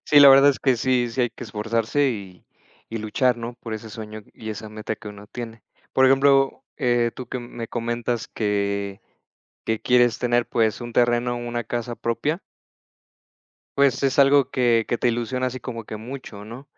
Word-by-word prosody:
Sí, 145 - +5
la 140 - +10
verdad 135 +1 +8
es 135 - -4
que 130 -3 +2
sí. 125 0 +1
Sí 125 - -2
hay 120 - +1
que - - -9
esforzarse 115 +5 0
y 95 -5 -8 0.5
y - - -2
luchar, 120 +4 +1
¿no?, 120 +1 -6
por 115 - -7
ese 110 0 -6
sueño 110 0 -8
y 110 -1 -7
esa 110 0 -7
meta 110 0 -5
que 110 - -14
uno 105 0 -10
tiene. 115 -2 -8 0.3
Por 130 0 +5
ejemplo, 135 0 +3
eh, 120 -4 +1
tú 130 - -8
que 125 - -3
me 120 -1 -7
comentas 120 0 -2
que 100 -1 -2 0.6
que 110 -1 -1
quieres 120 -1 +3
tener, 120 -1 +1
pues 110 -2 +1
un 120 -1 -6
terreno, 120 0 +2
una 120 0 -3
casa 120 +1 -4
propia 130 - -2 1.4
pues 140 0 +3
es 135 0 +2
algo 140 -1 +5
que 120 -3 +2
que 120 - 0
te 125 - +1
ilusiona 120 +2 -1
así 130 0 -5
como 115 -2 -6
que 110 - -6
mucho, 115 -3 -8
¿no? 120 +5 -9
120 Hz, 185 wpm, -23 LUFS, 110-130 Hz, 1.4 s, la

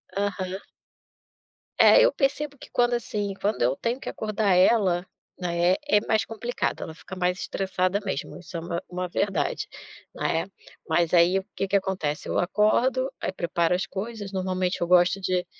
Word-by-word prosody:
Aham. 195 -1 -2 1.2
É, - - +8
eu - - +5
percebo 285 +1 -1
que - - -13
quando, 240 0 +2
assim, 205 -4 -3
quando 205 +1 -1
eu 125 +3 +3
tenho 235 - -2
que - - -6
acordar 215 -2 0
ela, 185 -2 +4 0.3
né, 175 0 +2
é 210 - +5
mais 220 -1 +2
complicado, 235 +2 -3
ela 160 - -6
fica 185 - -10
mais 180 0 0
estressada 190 0 -1
mesmo, 190 - -4
isso 180 -1 -7
é - - -2
uma 170 +1 -4
uma 180 0 -3
verdade, 190 0 -1 0.5
né? 165 +3 -1 0.4
Mas 165 +1 +2
aí, 175 +2 +5
o 190 - -3
que 195 - -1
que 200 - 0
acontece? 185 -6 -1
Eu - - 0
acordo, 235 +8 +2
aí - - -1
preparo 170 -1 0
as 180 0 -1
coisas 205 +2 -6
normalmente, 185 -1 -1
eu 175 - +1
gosto 180 +2 +4
de 185 -1 0
190 Hz, 170 wpm, -26 LUFS, 180-210 Hz, 1.2 s, É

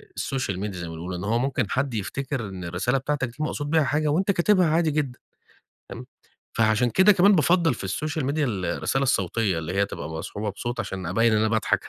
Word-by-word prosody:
السوشيال 125 -9 -2
ميديا 100 -2 -4
زي 85 - -5
ما 80 - -7
بنقول، 85 +3 -6
لأن 90 - -5
هو 115 +4 +1
ممكن 125 -5 -1
حدّ 130 0 -1
يفتكر، 135 +6 -3
إن 95 -2 -7
الرسالة 90 +10 0
بتاعتك 135 0 -1
دي 120 - -13
مقصود 145 -1 -2
بيها 160 0 +3
حاجة، 150 +2 0
وأنت 185 +7 +2
كاتبها 185 0 +3
عادي 160 -1 +2
جدًا. 140 -4 -2 0.7
فهِمت، - - -8 0.5
فعشان 110 +2 +2
كده 190 - +5
كمان 200 +1 +5
بافضّل 165 0 +3
في 110 - -8
السوشيال 150 +8 -2
ميديا 145 +2 0
ال 100 -7 -2
الرسالة 135 0 -1
الصوتية 105 -5 +1
اللي 80 +2 -5
هي 100 +1 +2
تبقى 75 -6 -7
مصحوبة 100 +6 -4
بصوت 120 +5 -5
عشان 95 -2 -4
أبين 115 +7 +2
إن 110 - +3
أنا 110 +1 +2
باضحك 110 0 0
120 Hz, 210 wpm, -25 LUFS, 100-150 Hz, 0.7 s, كده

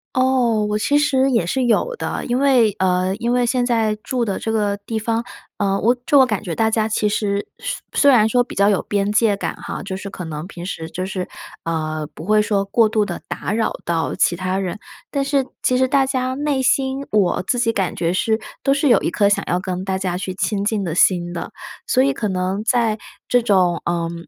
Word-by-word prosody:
哦， 255 -4 +2
我 210 - 0
其 285 +7 +1
实 270 -2 +2
也 230 -8 +2
是 255 +10 -1
有 485 - +1
的。 - - -4
因 245 +1 0
为， 260 -6 +4
呃， 185 0 +1
因 235 +2 -2
为 245 0 +2
现 250 0 +1
在 225 -3 +1
住 250 -2 -1
的 200 -4 -2
这 225 - -3
个 205 -2 0
地 225 -1 -2
方， 225 +1 -1 0.3
呃， 195 -1 0
我 240 +3 +3
就 290 -3 +5
我 265 - +7
感 215 -4 -2
觉 175 -4 -4
大 220 +4 +1
家 220 0 +1
其 210 -1 0
实 205 -1 -1
虽 - - -4 0.3
虽 285 - +7
然 220 -4 +5
说 245 +2 +3
比 - - -10
较 200 +1 +3
有 200 - +2
边 200 0 -1
界 215 -1 +3
感 200 - -4
哈， - - -6
就 190 -1 -5
是 200 +1 -7
可 180 - -7
能 155 -1 -6
平 175 -2 -9
时 160 -4 -5
就 185 - -4
是， 185 -1 -4 0.4
呃， 155 -2 -2
不 - - -9
会 215 +2 +3
说 205 -2 +1
过 215 +3 +3
度 215 0 +1
地 185 -4 -4
打 200 - -3
扰 225 0 0
到 165 -1 -1
其 175 - +2
他 185 +2 -2
人， 190 +2 -3 0.3
但 280 -1 -1
是 280 0 +1 0.2
其 255 0 +2
实 260 - +3
大 270 +1 +3
家 260 -1 -1
内 285 -1 0
心， 265 +1 +1
我 195 -5 +2
自 220 +7 -1
己 230 -1 +1
感 190 -5 -1
觉 170 +1 0
是 220 +4 +1 0.2
都 275 - +1
是 280 0 +2
有 - - +5
一 - - 0
颗 200 -2 +2
想 200 - +2
要 180 - +1
跟 185 0 -4
大 190 -1 -1
家 185 -2 -2
去 185 0 -4
亲 200 +1 -1
近 210 -1 0
的 170 - -3
心 175 0 +2
的。 170 - -5 0.4
所 255 - +3
以 275 0 +2
可 215 -5 -2
能 190 +2 -2
在 230 -2 +1 0.3
这 245 - +3
种， 185 -6 +2
嗯， 170 0 -3
210 Hz, 250 characters per minute, -20 LUFS, 185-245 Hz, 0.4 s, 我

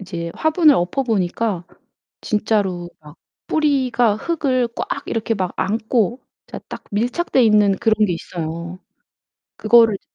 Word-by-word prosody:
이제 170 -3 -6
화분을 315 -1 +4
엎어보니까 195 -1 -1 0.6
진짜로 200 -5 -1
막 150 +1 -15 0.3
뿌리가 255 -8 +1
흙을 260 -3 0
꽉 - - -3
이렇게 225 0 -1
막 185 -4 -2
안고 225 +2 0 0.3
진짜 - - -8
딱 - - -8
밀착되어 245 +7 0
있는 210 -3 +4
그런 225 -2 +2
게 180 - -1
있어요. 170 +1 -6 0.8
그거를 225 -1 +5
이제 - - -26
215 Hz, 270 characters per minute, -20 LUFS, 185-245 Hz, 0.8 s, 그거를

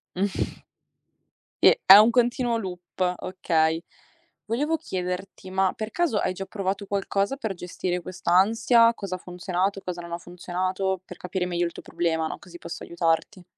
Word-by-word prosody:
Mh. 195 +1 -2 1.0
E - - +7
è 190 - +12
un 215 +3 +7
continuo 240 0 +2
loop, 180 -2 -3
okay. 165 -3 0 0.6
Volevo 295 +9 0
chiederti, 185 - -5
ma 190 0 +1
per 215 0 -5
caso 335 -12 +1
hai - - 0
già 195 +1 -6
provato 195 0 -3
qualcosa 200 +4 -1
per 220 -8 -4
gestire 180 +1 -3
quest'ansia? 225 +7 +3
Cosa 195 -4 -5
ha - - -5
funzionato, 185 +2 -2
cosa 175 -1 -5
non 170 - -9
ha 170 - -2
funzionato. 185 +2 -2
Per - - -11
capire 180 0 -3
meglio 175 -1 0
il 170 - -3
tuo - - -10
problema, 160 -2 -1
no. - - -5
Così 175 -1 -13
posso 170 - -7
aiutarti. 170 +3 -1
185 Hz, 160 wpm, -25 LUFS, 175-205 Hz, 1.0 s, è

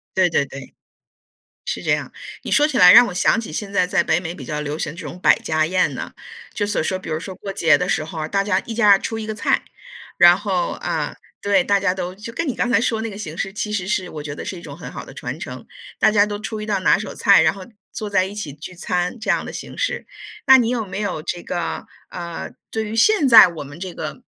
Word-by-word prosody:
对 185 -1 +4
对 145 - +1
对， 135 -1 -11 0.9
是 - - -4
这 - - -1
样， - - -2 0.3
你 - - -6
说 295 - +4
起 290 -4 -1
来 180 0 +9
让 245 - +9
我 190 - -6
想 185 +5 +2
起 215 - -8
现 200 +4 -5
在 185 -2 +2
在 180 - +2
北 160 +1 +1
美 175 -1 -5
比 135 - -9
较 150 +3 -4
流 150 +1 -4
行 155 - -4
这 - - -7
种 180 - -9
百 - - +5
家 155 0 0
宴 185 +2 +1
呐。 - - -6 0.4
就 205 - -2
所 205 - 0
说， 185 +4 -1
比 185 - -10
如 155 0 -2
说 190 +2 -7
过 195 +1 -7
节 165 -6 +4
的 180 - -2
时 155 - 0
候 160 +1 -8
啊， 155 - -3
大 200 0 +1
家 195 -2 +1
一 230 - -7
家 210 -4 +6
出 225 +3 -4
一 220 - -5
个 215 - -4
菜， - - 0 0.5
然 175 0 +7
后， 195 -3 -1
呃， - - -2 0.3
对， 200 -2 +3
大 200 +1 +2
家 195 -2 +1
都， 180 -1 -4
就 210 +4 -9
跟 325 +6 -2
你 255 - -1
刚 240 - -1
才 225 -2 +4
说 225 -2 0
那 225 - -3
个 200 - -9
形 165 -6 -7
式， 195 +1 -3
其 210 +1 -4
实 195 -3 -2
是 190 -2 -1
我 150 - -7
觉 145 -1 -6
得 - - -7
是 185 - -5
一 170 - -12
种 - - -9
很 - - -9
好 - - -8
的 - - -12
传 - - -6
承， - - -8 0.3
大 - - +4
家 205 -1 +4
都 205 -1 -4
出 220 0 -5
一 210 - -5
道 205 -3 0
拿 185 - +4
手 205 -1 -6
菜， 200 -3 +5
然 - - +3
后 195 -2 -10 0.3
坐 215 - -5
在 185 -2 +2
一 195 +2 -7
起 180 -9 -5
聚 150 +5 -10
餐 180 +5 -2
这 220 - -2
样 - - +1
的 - - -7
形 - - -8
式。 - - -2 0.4
那 265 - +9
你 235 -3 +2
有 235 -3 -1
没 190 - -6
有 200 -7 -3
这 175 +2 -4
个， 175 -1 -4 0.2
呃， 170 -1 -6 0.2
对 220 0 -2
于 215 +2 -5
现 325 - +4
在 230 -5 +10
我 160 -4 -7
们 145 +2 -11
这 185 -1 -5
个 - - -7
190 Hz, 290 characters per minute, -21 LUFS, 175-215 Hz, 0.9 s, 在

